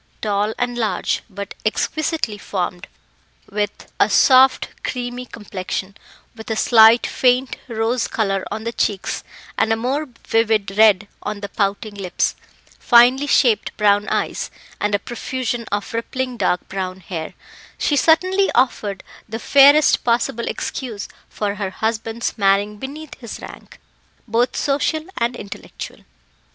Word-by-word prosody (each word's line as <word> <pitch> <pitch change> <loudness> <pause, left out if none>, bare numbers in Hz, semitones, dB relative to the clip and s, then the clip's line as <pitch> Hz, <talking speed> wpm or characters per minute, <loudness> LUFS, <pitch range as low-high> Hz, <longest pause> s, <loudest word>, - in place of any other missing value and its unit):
Tall 210 +1 0
and 245 -1 -2
large, 220 -2 0
but 200 0 -7
exquisitely 240 0 -1
formed, 180 -2 -4 0.6
with 205 0 -3
a - - +4
soft 260 0 +5
creamy 245 0 -4
complexion, 195 -2 -5 0.4
with 220 +1 -10
a 220 - 0
slight 225 +1 +6
faint 255 +1 +2
rose 230 +1 0
colour 195 -3 -1
on 220 +1 -5
the 230 - -2
cheeks, 200 -4 -1 0.4
and 225 - +2
a - - +4
more 265 +6 -2 0.2
vivid 215 -3 +1
red 210 -2 +5
on 210 -1 -5
the 200 - -5
pouting 205 +1 -1
lips, 190 -3 -1 0.4
finely 250 +4 +5
shaped 245 -6 +2
brown 205 -1 +3
eyes, - - -1 0.3
and 210 0 +1
a - - +3
profusion 240 +2 -4
of 205 +2 -3
rippling 255 +2 -3
dark 180 -5 0
brown 190 -1 -4
hair, 165 -3 -6 0.4
she 295 - +1
certainly 370 +7 +3
offered 210 -6 0 0.3
the 225 - -4
fairest 285 +5 +6
possible 235 -1 0
excuse 230 -6 -4 0.2
for 205 -1 -2
her 195 - -1
husband's 225 +3 -2
marrying 200 +1 +2
beneath 285 +6 -8
his 235 -4 -8
rank - - -12 0.5
both 235 +3 +1
social 300 +2 0
and 240 +1 0
intellectual. 200 -4 -8
225 Hz, 135 wpm, -20 LUFS, 205-250 Hz, 0.6 s, slight